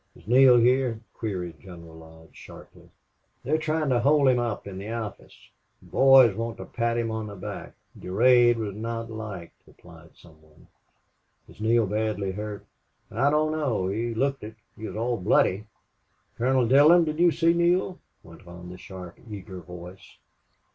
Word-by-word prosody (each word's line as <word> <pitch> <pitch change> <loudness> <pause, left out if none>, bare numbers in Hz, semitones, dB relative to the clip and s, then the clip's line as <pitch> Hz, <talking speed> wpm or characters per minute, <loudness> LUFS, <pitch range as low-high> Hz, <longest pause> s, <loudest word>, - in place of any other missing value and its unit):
"Is - - -19
Neale 125 +1 +6
here?" 125 -1 +2
queried 90 -7 -5
General 85 -2 -13
Lodge, 80 0 -16
sharply. - - -15 0.5
"They're 155 +4 0
trying 155 -1 -1
to 125 -2 +2
hold 140 +3 +3
him 125 -1 +2
up 120 -3 -3
in 95 -1 -8
the 100 +2 -7
office. 115 -3 -8 0.3
The - - -20
boys 135 -6 +6
want 115 +1 -4
to - - -8
pat 115 0 -2
him 115 -1 -2
on 110 -1 -4
the 100 - -9
back.... 90 - -8 0.2
Durade 120 +5 +3
was 105 -3 -4
not 115 +1 -5
liked," 105 -6 -8
replied 85 -1 -17
some 80 -2 -19
one. 80 0 -23 0.8
"Is - - -16
Neale 115 +1 +2
badly 105 -1 -2
hurt?" 105 +1 -7 0.5
"I 130 +6 +1
don't 155 +1 +1
know. 130 -12 -1
He 115 +3 -3
looked 135 +2 -1
it. 110 +1 -9 0.2
He 110 - -7
was - - -8
all 120 +2 -1
bloody." 100 +1 +1 0.7
"Colonel 130 0 +1
Dillon, 150 +7 +6
did 155 0 -4
you 175 0 +5
see 165 0 +2
Neale?" 175 +2 +1 0.2
went 85 +1 -16
on 90 0 -11
the 90 - -11
sharp, 90 -3 -11
eager 100 -2 -8
voice. 90 +1 -12
110 Hz, 170 wpm, -25 LUFS, 95-130 Hz, 0.8 s, Neale